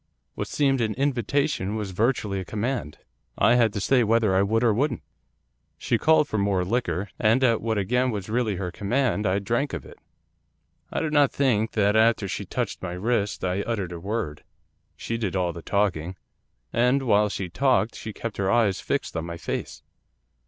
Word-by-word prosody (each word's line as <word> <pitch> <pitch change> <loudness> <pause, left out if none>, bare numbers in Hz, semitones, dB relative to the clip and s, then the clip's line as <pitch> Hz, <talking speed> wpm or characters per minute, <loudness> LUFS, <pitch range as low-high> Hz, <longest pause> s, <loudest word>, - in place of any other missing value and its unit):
What - - -4
seemed 135 -3 +1
an 110 -2 0
invitation 135 -4 0
was 105 -3 -3
virtually 105 -1 0
a - - -4
command. 110 - -3 0.4
I 115 +4 +4
had 120 -3 +4
to - - -2
stay 125 +5 +3
whether 110 -3 +2
I 95 - +4
would 110 +4 +1
or 115 -3 +4
wouldn't. 140 +8 -1 0.7
She - - 0
called 160 -1 +4
for 110 - -2
more 100 -2 +1
liquor, 105 -2 -1
and 115 +5 +3
at 115 -3 +3
what 110 -1 -1
again 125 +6 +1
was 105 -5 -4
really 110 -2 0
her 90 -1 -4
command 110 +1 0
I 95 +1 +2
drank 120 +8 -1
of - - -5
it. - - -14 0.9
I - - -1
do 155 - -1
not 145 -2 +4
think 115 -5 +1
that 105 -1 +2
after 110 -2 +3
she - - -4
touched - - -3
my 90 -1 -4
wrist 105 +2 -1
I 90 +2 0
uttered 100 -6 -3
a 85 - -6
word. 95 -5 -4 0.5
She 115 0 -4
did 100 -5 -2
all 90 -2 0
the 85 - -8
talking. 95 -4 -1 0.6
And, 125 +3 +2
while 105 -3 +3
she 95 -2 -4
talked, 115 +1 +1
she 110 - -7
kept 115 +1 -6
her 95 -1 0
eyes 110 -4 +2
fixed - - -2
on 80 - -2
my 85 0 -6
face. - - -5
110 Hz, 190 wpm, -25 LUFS, 95-120 Hz, 0.9 s, I